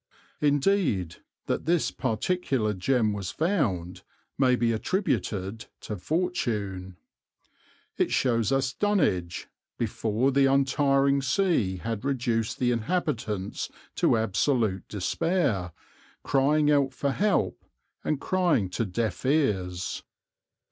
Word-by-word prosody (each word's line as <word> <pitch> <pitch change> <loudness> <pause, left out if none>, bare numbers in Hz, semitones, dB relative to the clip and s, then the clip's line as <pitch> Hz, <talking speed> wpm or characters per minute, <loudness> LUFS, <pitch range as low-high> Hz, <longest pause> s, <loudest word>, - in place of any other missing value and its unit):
Indeed 145 - +1 0.3
that - - -2
this 170 0 +2
particular 130 -2 -1
gem 110 +3 +1
was 100 -3 -4
found 110 - -1 0.3
may 130 -2 +3
be 120 -1 +1
attributed 110 - -2
to 105 - -5
fortune. 105 - -2 1.0
It - - +2
shows 115 -2 +1
us 135 -1 +1
Dunwich, 95 - 0 0.3
before 115 +2 0
the 135 0 +4
untiring 140 0 +3
sea 135 - +1
had 110 +2 -4
reduced 120 -5 -1
the 125 -1 +1
inhabitants 115 - -2 0.3
to - - +3
absolute 110 -1 0
despair, 105 - 0 0.5
crying 150 +2 +3
out 140 -2 +2
for 140 +1 0
help, 205 +7 0 0.4
and 150 - -1
crying 170 - +1
to 115 - -1
deaf 105 0 -2
ears. 95 - 0
125 Hz, 105 wpm, -27 LUFS, 105-145 Hz, 1.0 s, the